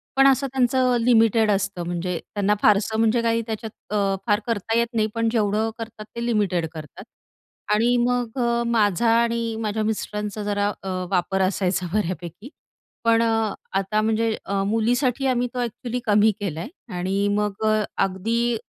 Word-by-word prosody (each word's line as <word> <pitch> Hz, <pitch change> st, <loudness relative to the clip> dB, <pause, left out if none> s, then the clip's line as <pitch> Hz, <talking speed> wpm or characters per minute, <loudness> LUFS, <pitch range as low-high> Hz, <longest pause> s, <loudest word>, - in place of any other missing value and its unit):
पण 270 Hz, 0 st, +6 dB
असं 270 Hz, +1 st, +3 dB
त्यांचं 255 Hz, -1 st, +2 dB
लिमिटेड 225 Hz, -2 st, +4 dB
असतं. 195 Hz, -3 st, -1 dB
म्हणजे 175 Hz, 0 st, -2 dB, 0.2 s
त्यांना 205 Hz, 0 st, +2 dB
फारसं 210 Hz, +1 st, +3 dB
म्हणजे 225 Hz, +1 st, +3 dB
काही 230 Hz, 0 st, +1 dB
त्याच्यात 220 Hz, -1 st, -7 dB
अ, 200 Hz, -2 st, +1 dB
फार 205 Hz, 0 st, +3 dB
करता 225 Hz, 0 st, -1 dB
येत 235 Hz, 0 st, +2 dB
नाही. 215 Hz, -1 st, +1 dB
पण 230 Hz, 0 st, +1 dB
जेवढं 215 Hz, 0 st, +1 dB
करतात 220 Hz, -2 st, -8 dB
ते 235 Hz, -, -3 dB
लिमिटेड 200 Hz, -8 st, +1 dB
करतात 155 Hz, -3 st, -9 dB, 0.7 s
आणि 235 Hz, +3 st, +3 dB
मग 245 Hz, 0 st, -1 dB
अ, 235 Hz, -1 st, +1 dB
माझा 225 Hz, -1 st, +2 dB
आणि 230 Hz, -1 st, -1 dB
माझ्या 215 Hz, 0 st, -1 dB
मिस्टरांचा 210 Hz, -1 st, -3 dB
जरा 205 Hz, 0 st, 0 dB
अ, 195 Hz, -, -4 dB, 0.2 s
वापर 190 Hz, +1 st, +1 dB
असायचा 185 Hz, -1 st, 0 dB
बऱ्यापैकी. 185 Hz, -, -3 dB, 0.5 s
पण 230 Hz, 0 st, +4 dB
अ, 225 Hz, -2 st, +1 dB, 0.3 s
आता 210 Hz, +2 st, 0 dB
म्हणजे 220 Hz, 0 st, +1 dB
अ, 195 Hz, 0 st, -1 dB
मुलीसाठी 245 Hz, +4 st, +1 dB
आम्ही 245 Hz, -1 st, +1 dB
तो 250 Hz, -, -3 dB
अ‍ॅक्चुअली 240 Hz, +1 st, -3 dB
कमी 210 Hz, +1 st, +4 dB
केलाय 170 Hz, -5 st, -4 dB, 0.3 s
आणि 195 Hz, +3 st, 0 dB
मग 210 Hz, +1 st, -2 dB
अ, 215 Hz, 0 st, +2 dB, 0.2 s
अगदी 225 Hz, +5 st, 0 dB
220 Hz, 155 wpm, -23 LUFS, 200-235 Hz, 0.7 s, पण